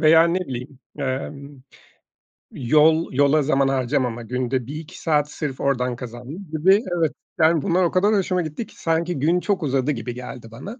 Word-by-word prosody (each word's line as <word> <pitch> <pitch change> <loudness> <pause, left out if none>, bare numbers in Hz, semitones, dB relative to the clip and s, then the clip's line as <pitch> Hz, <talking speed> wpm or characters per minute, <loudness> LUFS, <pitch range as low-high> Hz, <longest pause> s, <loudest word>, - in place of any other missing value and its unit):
veya 160 +1 +7
ne 180 +2 0
bileyim, 130 -3 -6 0.2
emm, 140 0 -5 0.9
yol 155 +5 +3
yola 145 +3 +4
zaman 135 -1 +2
harcamama, 125 -2 0
günde 125 +1 -2
1-2 150 +1 -8
saat 150 -2 +1
sırf 140 -4 -4
oradan 125 -3 0
kazandım 125 - -8
gibi 190 +7 +4
evet, 160 -3 +1 0.3
yani, 160 -1 +4
bunlar 185 +1 +2
o 170 - +2
kadar 200 +4 +3
hoşuma 185 -2 +1
gitti 160 +8 -5
ki - - -17
sanki 165 -1 0
gün 165 +6 +2
çok 190 -1 -1
uzadı 135 0 +1
gibi 120 -2 -4
geldi 125 -1 -8
bana. 200 - -9
145 Hz, 165 wpm, -22 LUFS, 130-165 Hz, 0.9 s, veya